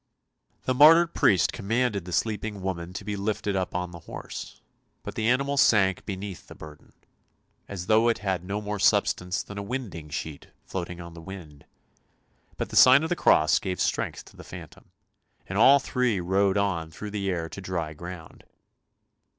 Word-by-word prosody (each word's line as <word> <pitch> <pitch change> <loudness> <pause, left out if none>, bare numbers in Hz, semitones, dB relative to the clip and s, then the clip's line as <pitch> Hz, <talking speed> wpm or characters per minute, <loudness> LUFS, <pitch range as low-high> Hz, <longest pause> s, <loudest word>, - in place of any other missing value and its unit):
The 130 - 0
martyred 165 +5 +7
priest 95 -5 +3
commanded 110 -2 -1
the 90 - -8
sleeping 105 +1 -2
woman 85 -2 -4
to 100 - -6
be 105 -1 -3
lifted 100 0 -2
up 95 -1 -2
on 90 -1 -2
to - - -15
the 85 - -10
horse, - - -8 0.4
but - - -6
the 110 - -1
animal 140 +3 +1
sank 100 -7 +3
beneath 95 -2 -6
the - - -12
burden, 75 -1 -13 0.7
as 95 -3 -6
though 110 +4 +4
it 115 - +1
had 95 -4 -2
no 100 +3 -3
more 105 0 -4
substance 90 -1 +1
than 100 0 -8
a - - -3
winding 100 -9 -6
sheet 75 0 -6 0.2
floating 90 -1 -5
on 85 -1 -9
the 85 - -11
wind; 80 -6 -11 0.9
but - - -3
the - - -7
sign 130 +4 +8
of 160 - -2
the 175 - +1
cross 80 - +4
gave 95 -2 -4
strength - - -1
to - - -17
the - - -11
phantom, - - -12 0.6
and 100 +2 -3
all 135 +5 +8
three 125 -6 0
rode 95 +2 +1
on 95 -5 -1
through 105 +6 -8
the 100 -2 -2
air 85 -3 -2
to 95 - -8
dry 85 -4 -3
ground. 85 +1 -10
95 Hz, 185 wpm, -26 LUFS, 90-110 Hz, 0.9 s, sign